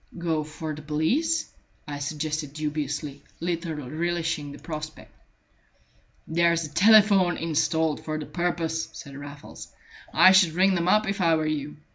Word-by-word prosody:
"Go 165 -3 -1
for 155 +1 -6
the 150 - -8
police," 250 - 0 0.3
I 145 -1 -5
suggested 150 0 -3
dubiously, 150 -1 -4 0.2
little 170 -1 -3
relishing 165 0 -2
the - - -10
prospect. 155 -1 -8 1.1
"There's 170 0 +2
a 150 - -10
telephone 200 -3 +5
installed 160 -1 0
for 155 -1 -3
the 155 - -5
purpose," 165 -2 -2
said 140 -3 -10
Raffles. 145 0 -10 0.4
"I 185 - +7
should 185 -4 +5
ring 190 +3 +3
them 170 -1 0
up, 215 +3 +3
if 195 -1 -2
I 165 -2 +4
were 155 -1 -1
you. 150 -1 -3
160 Hz, 145 wpm, -26 LUFS, 150-175 Hz, 1.1 s, I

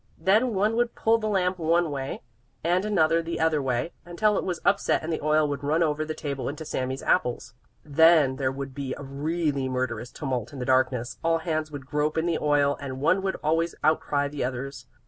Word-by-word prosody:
Then 215 +7 +2
one 210 +4 +2
would 240 0 0
pull 225 +1 +2
the 215 - -2
lamp 185 -2 0
one 165 0 +2
way, 135 -1 -4 0.4
and 180 +4 +1
another 165 -5 +3
the 165 0 -4
other 160 -2 +2
way, 130 +4 -1
until 210 +5 +1
it - - 0
was 180 -3 -3
upset 200 -4 +2
and 165 +1 -2
the - - -3
oil 155 0 +3
would 145 -1 -4
run 155 +4 +2
over 155 -1 0
the 155 0 -4
table 140 -3 -4
into 155 +3 -6
Sami's 130 -2 -3
apples. 125 -8 0 0.3
Then 155 -2 +5
there 130 -1 0
would 135 0 -6
be 135 -1 -4
a - - -8
really 140 0 -1
murderous 125 -2 -3
tumult 125 -5 -4
in - - -8
the 125 - -4
darkness; 130 -2 +1
all 165 0 +3
hands 155 -1 -2
would 145 -3 -8
grope 150 +3 -1
in 160 - +1
the 170 -2 0
oil 145 -1 +2
and 130 -2 -5
one 170 +7 +2
would 190 0 -1
always 165 +2 +1
outcry 150 -2 +2
the 145 0 -4
others. 125 0 -5
150 Hz, 210 wpm, -26 LUFS, 135-170 Hz, 0.4 s, Then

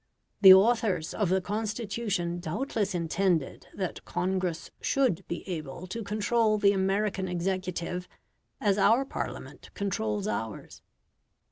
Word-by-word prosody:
The 190 -2 +11
authors 195 -5 +2
of 205 -5 0
the 190 +1 +2
Constitution 205 -3 -2
doubtless 205 - -2
intended 170 -2 0
that 185 -3 -4
Congress 180 -2 -2
should 260 -11 +1
be 170 - -5
able 165 -1 -5
to 205 +6 -5
control 215 +1 +1
the 200 -1 +4
American 195 0 0
executive 180 0 -3 0.5
as 205 -1 +2
our 230 +7 +4
Parliament - - -6
controls 110 - -2
ours. 105 0 -5
190 Hz, 115 wpm, -28 LUFS, 175-210 Hz, 0.5 s, The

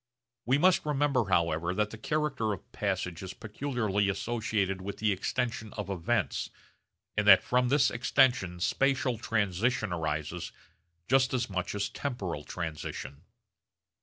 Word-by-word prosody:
We 130 +3 +4
must 180 +4 +4
remember 145 -4 +1
however 85 -1 +1
that 105 +1 0
the 115 - -7
character 135 -6 0
of 95 - -10
passage 90 -1 -2
is 95 -1 -7
peculiarly 110 -4 -1
associated 100 -2 -1
with 100 +2 -5
the 110 -1 +1
extension 115 +2 -2
of 105 -2 -4
events, 100 +4 -1 0.7
and 105 0 0
that 95 -2 +9
from 125 0 +2
this 140 +1 +4
extension 120 -7 +2
spatial 135 0 +1
transition 110 0 0
arises 80 +1 -3 0.6
just 130 0 +3
as 120 -4 -1
much 90 +1 -2
as 105 0 0
temporal 105 - -4
transition. 75 -2 -6
105 Hz, 135 wpm, -30 LUFS, 90-125 Hz, 0.7 s, that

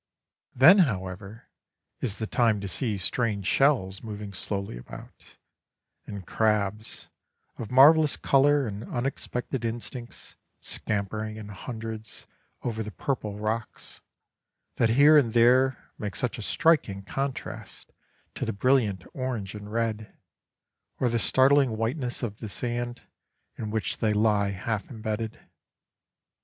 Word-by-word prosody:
Then, 165 +11 +8
however, 100 - -2 0.5
is 110 -6 -1
the 110 - -3
time 110 -1 +2
to 100 - -4
see 105 +2 -1
strange 100 +1 -1
shells 100 -8 +2
moving 105 -2 -7
slowly 100 - -3
about, - - -12 0.7
and 100 -3 -7
crabs, 105 0 -1 0.5
of 115 - -5
marvellous 150 +4 +6
colour 140 +1 +3
and 105 -1 -5
unexpected 125 0 -3
instincts, 120 +1 -6 0.2
scampering 110 +1 -3
in 105 -1 -8
hundreds 110 +1 -7 0.4
over 115 -2 -2
the 105 - -4
purple 105 -4 -3
rocks, 110 +1 -4 0.8
that 115 - +3
here 145 +6 +7
and 115 -6 0
there 125 +2 +3
make 105 -3 -4
such 125 -1 -2
a - - -5
striking 125 -7 +2
contrast 135 +6 -5 0.4
to - - -5
the - - -2
brilliant 105 -4 +2
orange 125 -7 -3
and 105 0 -9
red, 110 -1 -2 0.8
or 125 - +2
the 115 0 0
startling 130 -1 +4
whiteness 120 +3 -1
of 105 -3 -3
the 110 - -7
sand 120 +2 -3 0.5
in 110 - -5
which 110 -3 -2
they 110 -1 +2
lie 105 -1 +2
half 100 +2 -3
embedded. 110 -1 -4
110 Hz, 125 wpm, -27 LUFS, 105-125 Hz, 0.8 s, Then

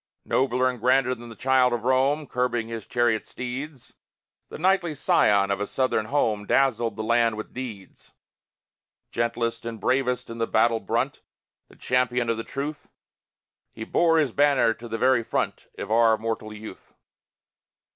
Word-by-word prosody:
Nobler 130 -1 +1
and 125 -1 -3
grander 125 +2 +3
than 120 -1 -10
the 115 - -10
Child 130 0 +3
of 120 -2 -2
Rome 135 +4 +2
Curbing 120 -3 -1
his 115 -2 -6
chariot 120 -3 +1
steeds, 130 +2 -7 0.6
The - - -8
knightly 175 -2 +1
scion 100 -7 +3
of 100 - -1
a 105 - -2
Southern 130 -5 0
home 110 -7 0
Dazzled 120 -5 +2
the 110 - -4
land 115 -1 +2
with 110 - -7
deeds. 115 -7 -8 1.0
Gentlest 115 0 -2
and 115 -1 -6
bravest 125 +2 0
in 115 - -8
the 115 - 0
battle 115 +1 +2
brunt, 120 +5 -2 0.5
The - - -19
champion 125 -2 0
of 115 - -2
the 115 - -4
truth, 145 +4 -6 0.8
He 110 - -7
bore 165 +7 +2
his 150 -6 +2
banner 140 -4 +3
to 120 +1 -11
the 115 - -4
very 130 +1 +3
front - - -3
Of - - -6
our 115 0 +5
immortal 110 -1 -4
youth. 105 +1 -11
120 Hz, 160 wpm, -25 LUFS, 115-130 Hz, 1.0 s, our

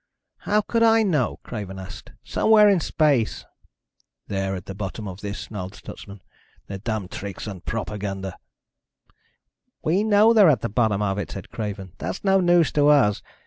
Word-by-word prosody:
"How 210 +1 +4
could 230 +2 -1
I 225 0 +5
know?" 155 - 0
Craven 100 -4 -6
asked. 95 0 -10
"Somewhere 215 -1 +4
in 200 -3 +4
space." 145 -8 +1 0.8
"They're 95 -1 -2
at 90 - -8
the 95 - -7
bottom 100 +2 -6
of 95 +1 -8
this," 100 -1 -5
snarled 95 -2 -7
Stutsman. 100 -1 -11 0.4
"Their 100 -1 -7
damned 105 -3 -4
tricks 100 -2 -6
and 95 -4 -7
propaganda." 100 -4 -4 1.5
"We 180 +6 +2
know 215 +1 +5
they're 205 -6 +7
at 140 - +2
the 115 - -2
bottom 105 -2 +1
of 100 0 -1
it," 100 - -4
said 95 - -9
Craven. 100 -4 -5
"That's 95 +3 -5
no 195 -1 +4
news 175 -2 +4
to 145 -1 +3
us. 135 -9 +4
105 Hz, 165 wpm, -23 LUFS, -, 1.5 s, they're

